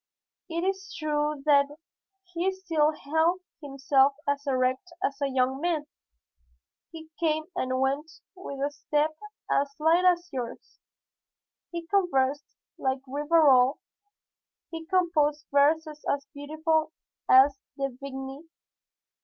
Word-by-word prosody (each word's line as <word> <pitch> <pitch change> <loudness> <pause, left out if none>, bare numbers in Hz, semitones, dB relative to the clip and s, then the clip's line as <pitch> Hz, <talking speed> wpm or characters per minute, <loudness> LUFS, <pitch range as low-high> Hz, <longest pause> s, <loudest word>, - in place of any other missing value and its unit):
It 335 +1 -2
is 390 +1 -2
true 300 -2 -1
that 285 0 +3 0.5
he 360 +1 -2
still 325 -5 +1
held 320 +4 0 0.2
himself 275 -1 +2
as 285 0 -1
erect 260 +5 0
as 280 -6 -2
a 280 - +2
young 260 +1 0
man, 330 -3 0 1.0
he 320 -1 -11
came 315 -1 +1
and 255 0 -1
went 275 +4 0 0.2
with 280 -7 -5
a - - -7
step 300 +1 -1 0.4
as 280 0 +1
light 325 +3 +3
as 355 -1 +3
yours, 245 -3 -6 0.9
he 340 -1 -6
conversed 295 -8 0 0.2
like 265 0 -1
Rivarol, 285 -2 +4 0.9
he 325 -1 -7
composed 325 -5 +1
verses 300 +2 +2
as 280 0 -2
beautiful 310 +2 -1 0.4
as 270 +1 +6 0.2
De 275 0 -1
Vigny's. 270 +3 -8
295 Hz, 115 wpm, -27 LUFS, 275-325 Hz, 1.0 s, as